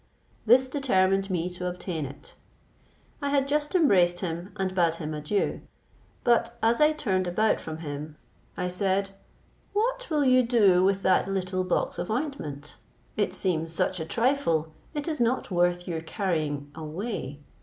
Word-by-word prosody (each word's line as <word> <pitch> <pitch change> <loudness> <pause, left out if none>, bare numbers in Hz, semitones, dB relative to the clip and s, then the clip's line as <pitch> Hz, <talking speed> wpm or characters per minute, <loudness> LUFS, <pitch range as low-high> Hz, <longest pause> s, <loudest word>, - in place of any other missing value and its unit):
This 255 +3 +6
determined 195 -8 +1
me 175 -2 -1
to 180 0 -4
obtain 175 -4 -4
it. 140 +2 -11 0.9
I 285 - -1
had 280 -1 +2
just 295 +4 0
embraced 180 - +4
him 175 +1 -4
and 190 -1 -1
bade 170 -3 +2
him 155 -2 -5
adieu; 150 +7 -1 0.6
but 235 0 +2
as 230 +4 +3
I 300 +1 +6
turned 190 -12 -1
about 215 +5 +1
from 160 -1 -6
him, 150 +1 -6 0.4
I 180 - -1
said, 195 +1 +1 0.6
"What - - 0
will 300 -3 +2
you 255 0 +6
do 210 -7 +4
with 195 +1 +2
that 185 0 +3
little 185 -1 -1
box 185 - -1
of - - -3
ointment? 215 - -4 0.4
It 205 -2 0
seems 165 -3 -1
such 185 +1 0
a 160 - -3
trifle, 170 - +1 0.2
it 295 +1 -3
is 310 -2 -2
not 235 -2 0
worth 175 0 +1
your 165 -2 -3
carrying 155 -5 -2
away. 160 - -5
185 Hz, 155 wpm, -27 LUFS, 165-240 Hz, 0.9 s, This